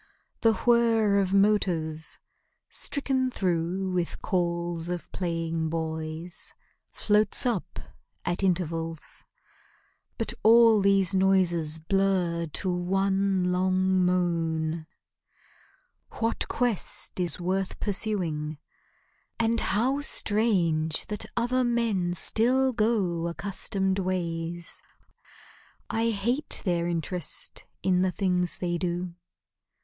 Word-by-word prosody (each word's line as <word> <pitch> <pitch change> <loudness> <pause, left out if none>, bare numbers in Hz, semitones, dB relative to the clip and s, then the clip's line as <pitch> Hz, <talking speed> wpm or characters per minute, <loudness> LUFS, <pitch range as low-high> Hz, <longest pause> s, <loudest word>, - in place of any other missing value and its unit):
The 225 -1 +5
whir 225 -4 +4
of 190 -1 0
motors, 180 -6 +1 0.5
stricken 265 -3 -1
through 185 -2 -1
with 175 -2 -2
calls 170 -2 -1
Of 175 -1 -5
playing 165 -2 -2
boys, 160 +1 -5 0.4
floats 210 +1 +3
up 235 -7 -2 0.5
at 175 +2 -1
intervals; 165 -3 -2 0.9
But - - -1
all 225 -1 +6
these 195 -1 +3
noises 180 -5 +2
blur 175 -1 0
to 180 +4 -1
one 190 +1 +1
long 185 0 +2
moan. 165 -3 0 1.3
What 225 0 -1
quest 240 -6 -3
is 175 -2 +1
worth 185 +2 -2
pursuing? 175 -8 -1 0.8
And 230 0 +2
how 255 +8 +1
strange 180 - +1
That 210 +1 -3
other 250 +2 +1
men 225 -7 0
still 255 +7 +3
go 205 -7 +1
accustomed 190 +2 -1
ways! 170 -2 -3 1.1
I 225 +1 +1
hate 235 +7 -1
their 170 -2 +1
interest 175 0 -3 0.2
in 180 -1 +3
the 185 - +2
things 180 0 0
they 175 -1 -2
do. 175 0 -2
185 Hz, 95 wpm, -27 LUFS, 170-210 Hz, 1.3 s, all